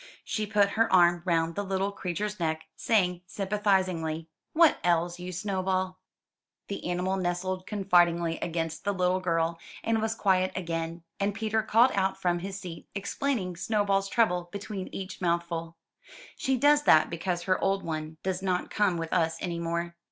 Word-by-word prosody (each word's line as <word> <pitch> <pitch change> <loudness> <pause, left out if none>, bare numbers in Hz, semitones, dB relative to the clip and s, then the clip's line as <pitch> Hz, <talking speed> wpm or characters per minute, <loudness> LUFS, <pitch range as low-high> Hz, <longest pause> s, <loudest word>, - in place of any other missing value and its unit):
She 215 -1 -2
put 205 -1 +3
her 225 +3 +1
arm 175 -1 +5
round 165 -2 +1
the 205 - -2
little 195 0 -1
creature's 200 +2 -3
neck, 160 -1 -1
saying 180 -6 +1
sympathizingly, 185 -6 0 0.2
*'What 330 -1 +5
ails 175 0 +1
you, 180 +1 -5
Snowball?" 185 0 -1 0.7
The 200 -3 -4
animal 180 +2 0
nestled 185 +1 -2
confidingly 175 -5 +2
against 165 -1 -3
the 200 -1 0
little 180 0 +2
girl, 165 -2 0 0.2
and 225 -1 +1
was 220 0 -1
quiet 185 -3 +2
again; 165 -2 -3 0.2
and 200 0 0
Peter 220 0 0
called 225 +4 +4
out 195 -1 0
from 175 -2 +1
his 195 +2 -5
seat, 175 -4 -9
explaining 200 -2 -2
Snowball's 195 -1 +1
trouble 180 -7 +1
between 200 -2 -5
each 190 0 -7
mouthful. 170 -1 -1 0.6
She 265 0 0
does 290 +3 +5
that 155 - +6
because 175 +1 -2
her 185 +1 +1
old 195 0 +1
one 155 -1 -4
does 190 -1 -1
not 185 -2 -1
come 200 -4 +2
with 165 -1 -4
us 165 -2 +1
any 170 -2 -3
more. 170 0 -2
185 Hz, 160 wpm, -28 LUFS, 170-200 Hz, 0.7 s, that